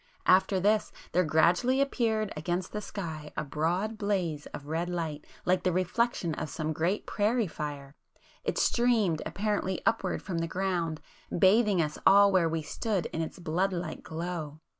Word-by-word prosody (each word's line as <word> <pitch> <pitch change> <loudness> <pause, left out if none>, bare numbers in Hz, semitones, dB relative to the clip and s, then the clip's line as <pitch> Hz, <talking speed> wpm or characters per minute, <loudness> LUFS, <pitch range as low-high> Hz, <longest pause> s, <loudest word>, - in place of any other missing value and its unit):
After 190 +1 +4
this, 210 +3 +2 0.2
there 180 +2 +3
gradually 175 - +3
appeared 225 -6 0
against 175 +4 -2
the 210 - -4
sky 160 -8 -6
a - - 0
broad 175 +9 -1
blaze 180 -8 -1
of 140 - -9
red 165 +4 -2
light 160 -4 -4 0.2
like 180 0 +3
the 185 - +1
reflection 185 0 0
of 155 0 -4
some 155 0 -2
great 170 +7 0
prairie 220 +3 +1
fire,—it 145 -4 -7
streamed 225 -9 +2
apparently 205 -2 -1
upward 225 -5 0
from 180 -4 -3
the 165 - -1
ground, 175 -4 -1 0.4
bathing 195 -1 +4
us 150 0 -4
all 200 0 +7
where 180 -4 +3
we 160 -1 -2
stood, 200 +3 -2
in 165 - -1
its 160 - -5
blood 180 +3 0
like 175 -2 -4
glow. 160 -2 -5
180 Hz, 160 wpm, -29 LUFS, 160-205 Hz, 0.4 s, all